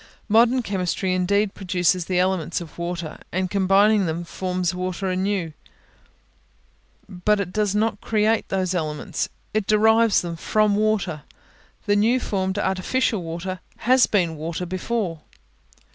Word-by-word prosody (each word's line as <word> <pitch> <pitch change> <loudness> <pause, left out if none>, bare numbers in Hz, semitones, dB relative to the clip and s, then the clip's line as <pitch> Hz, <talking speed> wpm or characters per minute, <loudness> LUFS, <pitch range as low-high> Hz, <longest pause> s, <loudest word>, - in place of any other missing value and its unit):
Modern 235 +3 +4
chemistry 185 -2 -1
indeed 195 +3 +1
produces 180 -2 0
the 180 0 -1
elements 180 -3 0
of 170 -1 -11
water, 170 -2 -4
and, 185 0 -1
combining 200 +1 +3
them, 165 +2 -3
forms 180 0 -2
water 185 +1 -3
anew; 185 -3 -1 1.5
but 205 +2 0
it 185 -2 -3
does 210 -2 0
not 215 -1 0
create 220 +1 +1
those 185 -1 0
elements 155 -4 -3 0.2
it 215 -2 0
derives 220 +1 +4
them 170 -1 -5
from 215 +4 +2
water; 205 -7 0 0.6
the 205 - +2
new 225 +5 +3
formed 190 -4 -2
artificial 200 +3 0
water 175 +3 -5 0.2
has 255 +2 +4
been 175 -6 +1
water 165 +3 -4
before. 185 -2 -3
190 Hz, 130 wpm, -23 LUFS, 180-210 Hz, 1.5 s, Modern